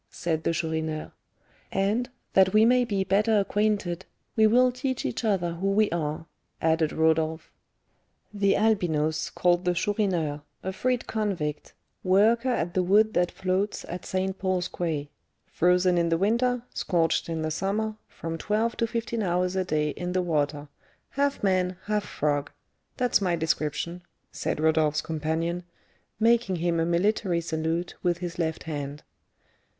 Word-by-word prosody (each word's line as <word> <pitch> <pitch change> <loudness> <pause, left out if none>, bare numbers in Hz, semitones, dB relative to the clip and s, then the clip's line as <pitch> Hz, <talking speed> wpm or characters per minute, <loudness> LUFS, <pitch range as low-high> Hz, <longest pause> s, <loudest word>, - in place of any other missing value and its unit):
said 160 -2 -2
the - - +1
Chourineur. 160 -1 -2 0.6
"And, 210 +6 0 0.2
that 190 0 +5
we 215 +1 +6
may 250 +1 +4
be 200 -4 0
better 210 +3 +3
acquainted, 200 -3 0 0.3
we 220 -1 +5
will 250 +3 +4
tell 260 +1 -2
each 125 - -2
other 185 -6 +1
who 180 +4 -2
we 205 +2 +3
are," 155 -1 -2 0.3
added 160 -1 +2
Rodolph. 160 0 +1 0.8
"The 200 -1 +2
Albinos 160 -8 +1
called 175 0 +2
the 180 -1 +1
Chourineur 175 -7 0 0.2
a 190 - -3
freed 250 +3 0
convict, 185 -9 -3 0.3
worker 220 +7 +4
at 175 -8 -1
the 185 - +2
wood 210 +4 +4
that 175 0 +2
floats 190 +2 -2
at 175 +1 -6
St. 190 0 -2
Paul's 185 -2 0
Quay; 150 -4 -3 0.3
frozen 180 0 +3
in 170 0 +1
the 165 - +2
winter, 235 +5 +1
scorched 165 -2 0
in 160 -1 -2
the 155 - -1
summer, 210 +6 -1
from 165 0 -6
twelve 220 +5 0
to 230 - +1
fifteen 230 0 -2
hours 180 -1 0
a 190 - +1
day 155 -4 0
in 180 +3 -4
the 185 0 +1
water; 150 -3 -1 0.4
half 280 -3 0
man, 185 -2 +1
half 210 -1 -1
frog; 145 -1 -1 0.5
that's 250 -4 +2
my 180 -3 +1
description," 160 +2 -2 0.3
said - - -3
Rodolph's 155 -1 +2
companion, 160 +2 -2 0.6
making 230 -3 +3
him 170 0 0
a 165 - +1
military 180 +1 +1
salute 165 +1 -2
with 175 -2 +1
his 175 0 -6
left 160 -1 -1
hand. 145 -2 -5
180 Hz, 150 wpm, -27 LUFS, 160-210 Hz, 0.8 s, we